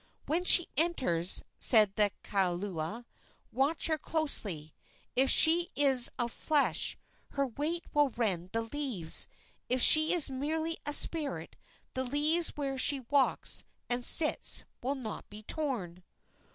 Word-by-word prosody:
"When 340 +4 -2
she 350 -1 +6
enters," 250 - 0 0.2
said 215 -5 +4
the 210 0 +1
kaula, 190 +2 -4 0.5
"watch 280 +4 0
her 315 -1 0
closely. 205 - -1 0.4
If 265 +1 +2
she 340 +2 +5
is 270 -4 +5
of 240 -2 -2
flesh 295 +3 -1 0.4
her 280 0 -1
weight 300 +7 -3
will 295 -1 +1
rend 190 -7 -4
the 230 0 -2
leaves; 225 - -3 0.4
if 255 - 0
she 310 +5 +6
is 345 -5 +2
merely 315 +5 -4
a 295 - -1
spirit 305 -1 -1 0.4
the 260 - -3
leaves 300 +6 +2
where 275 -2 -5
she 275 +1 +2
walks 280 -2 +1 0.3
and 245 0 -1
sits 305 +4 +4 0.2
will 270 +3 -3
not 235 -6 -9
be 210 +1 -13
torn." 215 - -5
270 Hz, 135 wpm, -29 LUFS, 215-305 Hz, 0.5 s, she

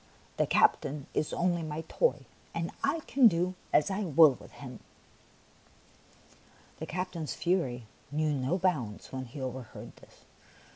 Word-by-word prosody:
The - - +2
captain 140 0 +2
is 155 - 0
only 175 -1 +1
my 155 0 -4
toy, 485 - +1 0.3
and 170 0 -2
I 290 +4 +1
can 270 -4 +5
do 180 -1 +1 0.2
as 150 - +3
I 195 +2 -1
will 160 -3 +7
with - - -14
him." 125 -4 -9 2.0
The - - -5
captain's 180 -2 -3
fury 135 -10 0 0.3
knew 155 +1 +1
no 135 +5 0
bounds 150 - -1
when 130 0 -4
he 125 +4 -9
overheard 130 -2 -7
this. - - -19
155 Hz, 140 wpm, -30 LUFS, 130-180 Hz, 2.0 s, will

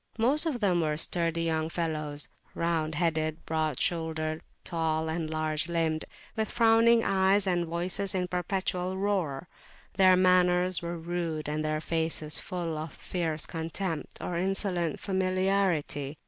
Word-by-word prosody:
Most 275 +8 +3
of 275 -7 -1
them 180 -4 +3
were 155 -1 0
sturdy 165 0 +1
young 160 -1 0
fellows, 155 -3 -1 0.3
round 160 -2 0
headed, 155 -1 -1
broad 155 -4 -1
shouldered, 160 -2 -1 0.2
tall 160 -1 -1
and 160 0 -2
large 155 0 -1
limbed, 165 -2 0 0.3
with 220 -1 -1
frowning 230 0 +5
eyes, 195 +1 +3
and 175 -2 +1
voices 180 +4 0
in 185 - +1
a - - -3
perpetual 180 +1 -2
roar. 180 -7 -1 0.5
Their 185 -1 +7
manners 180 0 +3
were 170 0 -4
rude, 165 -2 -3
and 150 +1 -1
their 155 0 0
faces 160 -2 -1
full 170 -4 -4
of 155 -1 -6
fierce 160 -4 -2
contempt 165 +1 -4
or 170 -1 -3
insolent 185 -3 0
familiarity. 185 -6 0
170 Hz, 140 wpm, -29 LUFS, 155-185 Hz, 0.5 s, Their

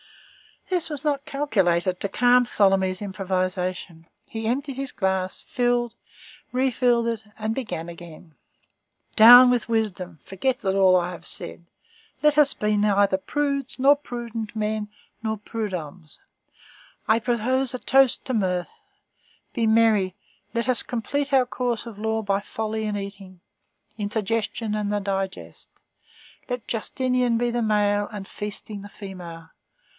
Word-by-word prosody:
This 355 -3 -1
was 295 -2 -5
not 290 -1 0
calculated 190 - +1
to 200 - -3
calm 245 +4 +4
Tholomyès' 195 -3 +2
improvisation; 185 -3 -3 0.2
he 225 0 -5
emptied 270 +3 -2
his 275 -1 -4
glass, 190 -1 -1
filled, 240 -1 0 0.6
refilled 250 -2 +2
it, 230 -2 -2
and 220 0 -2
began 215 -10 -4
again:— 170 -1 -12 0.8
"Down 245 +3 +10
with 245 -1 0
wisdom! 185 -7 -2
Forget 250 +7 -2
all 190 -1 +4
that 185 - +6
I - - -5
have 175 - -10
said. 170 - -6 0.6
Let 300 0 +4
us 295 -2 +5
be 210 0 0
neither 200 -2 +3
prudes 280 +4 -2
nor 275 +2 +6
prudent 235 -5 -6
men 215 0 -1 0.3
nor 220 -1 -2
prudhommes. 185 -7 -6 0.9
I 220 0 +4
propose 245 +3 0
a - - -4
toast 270 -1 +3
to 260 - -2
mirth; 185 -5 0 0.8
be 230 -3 +1
merry. 220 -4 +3 0.4
Let 235 +2 -1
us 250 - +4
complete 280 +4 -2
our 260 -2 +5
course 245 -2 -2
of 225 -3 -9
law 220 0 -1
by 200 -1 +1
folly 220 +1 -4
and 210 -1 -2
eating! 195 -2 -8 0.6
Indigestion 215 +1 -2
and 210 -1 -1
the 205 0 0
digest. 195 -1 -4 0.8
Let 245 -2 -3
Justinian 250 +1 0
be 240 +1 0
the 240 0 -1
male, 205 -2 +2
and 200 -2 -7
Feasting, 210 0 -6
the 205 - -10
female! 175 -5 -9
220 Hz, 140 wpm, -24 LUFS, 195-245 Hz, 0.9 s, Down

